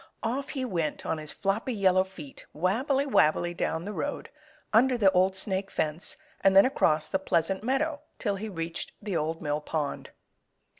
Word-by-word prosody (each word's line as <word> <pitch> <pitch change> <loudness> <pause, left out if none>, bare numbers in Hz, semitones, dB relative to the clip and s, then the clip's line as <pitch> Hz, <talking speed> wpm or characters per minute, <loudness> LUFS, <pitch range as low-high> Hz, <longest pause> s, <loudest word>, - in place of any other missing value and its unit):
Off 260 +5 -2
he 265 -3 -2
went 170 -9 -2
on 160 - -1
his 155 -1 -4
floppy 210 +5 -1
yellow 185 -2 +4
feet, 190 -7 -11
wabbly, 255 - +1
wabbly 175 - +3
down 165 0 -2
the 210 - -4
road, 285 +7 -4 0.4
under 250 +3 +5
the 200 -4 +5
Old 190 +1 +3
Snake 190 0 0
Fence 155 +3 -1 0.3
and 195 0 +5
then 195 - +9
across 155 - +2
the 190 - -1
Pleasant 190 +1 0
Meadow 285 +4 0 0.2
till 205 -4 -1
he 215 +3 -5
reached 165 -3 -4
the 205 -3 -3
Old 160 +1 -2
Mill 150 0 -1
Pond. 150 -1 -3
190 Hz, 170 wpm, -28 LUFS, 165-225 Hz, 0.4 s, then